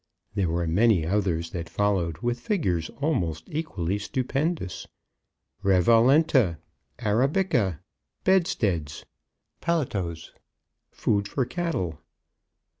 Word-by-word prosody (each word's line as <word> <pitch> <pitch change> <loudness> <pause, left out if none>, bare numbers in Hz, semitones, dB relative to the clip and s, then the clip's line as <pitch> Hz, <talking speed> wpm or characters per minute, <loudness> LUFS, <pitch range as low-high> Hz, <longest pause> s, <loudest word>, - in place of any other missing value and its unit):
There 95 -4 0
were 85 +1 0
many 95 +1 +3
others 85 -3 0
that 85 -1 -5
followed 90 -3 0
with 120 0 0
figures 95 - -1
almost 85 - 0
equally 105 - -2
stupendous. 135 - -2 0.8
Revalenta 115 - +4 0.4
Arabica! 120 - +1 0.5
Bedsteads! 105 - +1 0.6
Paletots! 100 - -2 0.6
Food 100 -1 0
for 130 +5 -1
Cattle! 120 - -2
100 Hz, 85 wpm, -26 LUFS, 85-135 Hz, 0.8 s, Revalenta